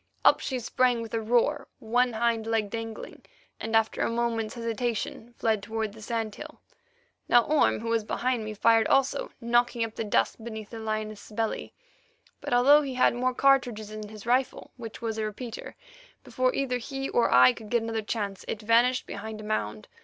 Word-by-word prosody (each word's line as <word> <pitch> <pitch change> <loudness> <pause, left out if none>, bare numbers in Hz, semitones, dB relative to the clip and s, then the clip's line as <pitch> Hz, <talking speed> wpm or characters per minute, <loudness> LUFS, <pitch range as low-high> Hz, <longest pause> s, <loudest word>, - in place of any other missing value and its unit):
Up - - +6
she 260 - -3
sprang 245 0 +1
with 225 - -10
a 225 - 0
roar, 245 +6 +1
one 245 +2 +1
hind 225 0 0
leg 220 -3 0
dangling, 225 -1 -6 0.4
and 225 +1 -2
after 225 0 +2
a - - +1
moment's 230 -2 -1
hesitation, 230 0 -3
fled 220 -2 +1
toward 220 0 -3
the 220 - -13
sand 225 -1 -3
hill. - - -10 0.7
Now 240 -1 +6
Orme, 300 -5 +2
who 230 - -4
was 230 -1 +1
behind 240 +2 -1
me, 215 0 -5
fired 225 +2 +4
also, 275 +1 +2
knocking 240 0 +2
up 225 -1 -4
the 225 - -3
dust 220 +1 0
beneath 220 -2 -7
the 230 - -7
lioness's 215 -1 -4
belly, 225 0 -2 0.6
but - - -6
although 270 +5 +6
he 270 -3 -4
had 255 - +4
more 250 +1 0
cartridges 245 -6 +2
in 215 -1 -7
his 215 -1 -11
rifle, 250 +2 0
which 235 -1 -9
was 225 -1 -2
a - - 0
repeater, 225 +2 -7 0.5
before 255 0 0
either 255 -2 -1
he 270 +2 -4
or 240 - +2
I 125 0 +7
could 215 - -11
get 235 0 +1
another 225 -1 -2
chance, 205 -3 -4
it 215 - -3
vanished 240 +3 +3
behind 220 -1 -7
a - - -8
mound. 110 - -3
230 Hz, 190 wpm, -27 LUFS, 215-245 Hz, 0.7 s, I